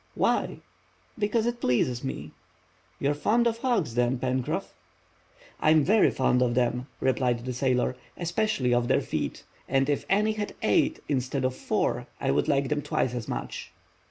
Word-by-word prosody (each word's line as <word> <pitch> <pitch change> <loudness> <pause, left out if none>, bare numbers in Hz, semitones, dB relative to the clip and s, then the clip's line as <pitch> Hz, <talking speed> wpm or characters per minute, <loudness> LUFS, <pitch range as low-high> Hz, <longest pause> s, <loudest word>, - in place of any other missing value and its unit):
"Why?" - - +1 0.6
"Because 220 +2 +1
it 240 0 -2
pleases 125 0 +1
me." 80 - -5 0.7
"You 140 - +1
are - - +1
fond 230 +11 +2
of 230 -1 +1
hogs, 230 - 0
then, 125 +2 +1
Pencroff?" 130 0 -2 0.9
"I - - +3
am 155 -1 +5
very 210 +7 +5
fond 125 -1 +2
of 120 -1 +2
them," 125 +1 0
replied 125 -2 +1
the 130 - -3
sailor, 125 0 +1 0.2
"especially 170 - 0
of 120 0 +2
their - - +3
feet, - - -3 0.3
and 135 0 +2
if 145 - -1
any 210 +3 +3
had 215 -1 -4
eight - - +2
instead 130 -1 -1
of 130 0 0
four - - -1
I - - +1
would - - +1
like 140 -1 +2
them 150 -1 0
twice 150 -5 -1
as 120 -3 -4
much." - - -5
135 Hz, 170 wpm, -27 LUFS, 125-195 Hz, 0.9 s, am